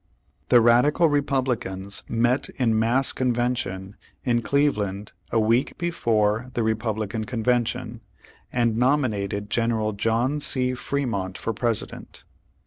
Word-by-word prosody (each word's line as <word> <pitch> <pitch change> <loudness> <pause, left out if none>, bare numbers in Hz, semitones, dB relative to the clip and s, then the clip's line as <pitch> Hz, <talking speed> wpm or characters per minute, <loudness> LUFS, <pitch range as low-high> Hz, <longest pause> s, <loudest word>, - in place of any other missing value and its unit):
The 120 -2 +6
radical 125 +8 +4
Republicans 125 -9 -1
met 120 +3 +1
in 115 -4 +2
mass 120 +4 +3
conven 125 -1 0
tion, 95 -2 -6 0.3
in 120 -2 +1
Cleveland, 105 -8 0 0.2
a 115 - +1
week 115 +4 +1
^ - - -43
before 115 - 0
the 120 - +1
Republican 110 -1 -2
Convention, 120 0 -1 0.5
and 115 -2 +1
nominated 105 -7 0
General 115 -2 0
John 115 +8 0
C. 130 -2 +1
Fre 140 +3 -2
mont 95 -6 -3
for 115 - -3
President. 115 -1 -4
115 Hz, 125 wpm, -24 LUFS, 110-125 Hz, 0.5 s, The